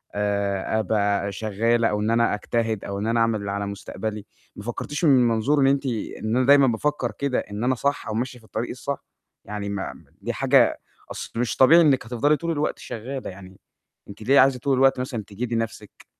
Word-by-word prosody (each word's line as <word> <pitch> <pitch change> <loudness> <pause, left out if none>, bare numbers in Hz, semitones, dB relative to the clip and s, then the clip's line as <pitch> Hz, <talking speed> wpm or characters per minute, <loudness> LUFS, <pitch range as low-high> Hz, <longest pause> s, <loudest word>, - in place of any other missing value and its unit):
آآ 100 +1 0
أبقى 100 -1 0
شغاّلة 115 +3 +1
أو 105 - -1
إن 110 +2 0
أنا 115 0 +3
أجتهد 110 0 -2
أو 100 0 -4
إن 105 - -2
أنا 115 +1 +1
أعمل 115 -2 +2
اللي 100 0 -4
على 100 0 -2
مستقبلي، 105 +1 -5 0.3
ما 105 - -9
فكرتيش 145 - -3
من 130 -4 +5
منظور 135 +5 +3
أنتِ 140 0 +1
إن 115 0 -2
أنا 130 - +2
دايمًا 140 -1 +7
بافكّر 125 +1 -1
كده 135 +4 -1
إن 105 +2 -5
أنا 130 +1 +2
صح 140 +4 -1
أو 110 - -3
ماشية 125 +3 -3
في 110 - -21
الطريق 110 +2 -4
الصح؟ 140 +3 -5 0.4
يعني 100 0 -5
ما 100 -1 -4
ما - - -19
دي - - -3
حاجة - - +3 0.3
أصل - - -6
مش 120 - -1
طبيعي 150 +6 +7
إنِّك 140 -7 +3
هتفضلي 125 +6 +1
طول 170 +1 -3
الوقت 150 -1 -1
شغالة 130 +4 -6
يعني، 95 0 -12 0.5
أنتِ 100 - -11
ليه 135 +5 +5
عايزة 130 -1 +4
طول 135 +2 +1
الوقت 135 0 +4
مثلًا 120 -4 -4
تجهدي 115 +4 -4
نفسِك؟ 115 -2 -5
115 Hz, 200 wpm, -24 LUFS, 105-130 Hz, 0.5 s, دايمًا